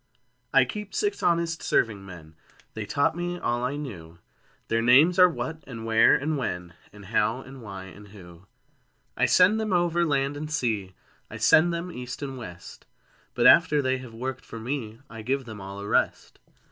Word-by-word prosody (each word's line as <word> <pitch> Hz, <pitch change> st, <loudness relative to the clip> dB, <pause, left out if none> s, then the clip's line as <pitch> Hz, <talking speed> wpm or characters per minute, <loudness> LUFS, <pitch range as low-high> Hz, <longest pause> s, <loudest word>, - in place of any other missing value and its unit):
I 135 Hz, -1 st, +5 dB
Keep 210 Hz, +9 st, -7 dB
six 410 Hz, -1 st, -1 dB
honest 170 Hz, -1 st, +1 dB
serving 105 Hz, -4 st, 0 dB
men: 85 Hz, -5 st, -12 dB, 0.4 s
(They 110 Hz, -2 st, -6 dB
taught 140 Hz, +9 st, +1 dB
me 175 Hz, 0 st, -3 dB
all 120 Hz, -7 st, -1 dB
I 130 Hz, +3 st, -1 dB
knew) 90 Hz, -, -8 dB, 0.5 s
Their 115 Hz, 0 st, +1 dB
names 145 Hz, +10 st, +5 dB
are 180 Hz, 0 st, +8 dB
What 160 Hz, -1 st, -5 dB
and 115 Hz, -4 st, -8 dB
Where 115 Hz, 0 st, +5 dB
and 150 Hz, +1 st, -1 dB
When 90 Hz, -8 st, -4 dB, 0.2 s
And 105 Hz, -1 st, -14 dB
How 110 Hz, +4 st, 0 dB
and 130 Hz, 0 st, -12 dB
Why 100 Hz, -4 st, -8 dB
and 100 Hz, +2 st, -13 dB
Who. 90 Hz, -2 st, -15 dB, 0.7 s
I -, -, +2 dB
send 190 Hz, +4 st, +5 dB
them 215 Hz, -2 st, -2 dB
over 175 Hz, -1 st, +2 dB
land 140 Hz, -3 st, 0 dB
and 150 Hz, +1 st, -5 dB
sea, 110 Hz, -, -2 dB, 0.3 s
I -, -, -8 dB
send 170 Hz, +2 st, +5 dB
them 170 Hz, +1 st, -4 dB
east 125 Hz, 0 st, -7 dB
and 135 Hz, -1 st, -5 dB
west; 90 Hz, -8 st, -11 dB, 0.5 s
But -, -, +1 dB
after 165 Hz, -3 st, +6 dB
they 130 Hz, -1 st, 0 dB
have 125 Hz, -3 st, -11 dB
worked 130 Hz, +2 st, -5 dB
for 115 Hz, -, -9 dB
me, 115 Hz, -1 st, -5 dB
I 115 Hz, -1 st, -9 dB
give 130 Hz, +4 st, -2 dB
them 110 Hz, -3 st, -9 dB
all 100 Hz, +1 st, -8 dB
a 100 Hz, -, -6 dB
rest. -, -, -1 dB
125 Hz, 185 wpm, -26 LUFS, 105-155 Hz, 0.7 s, are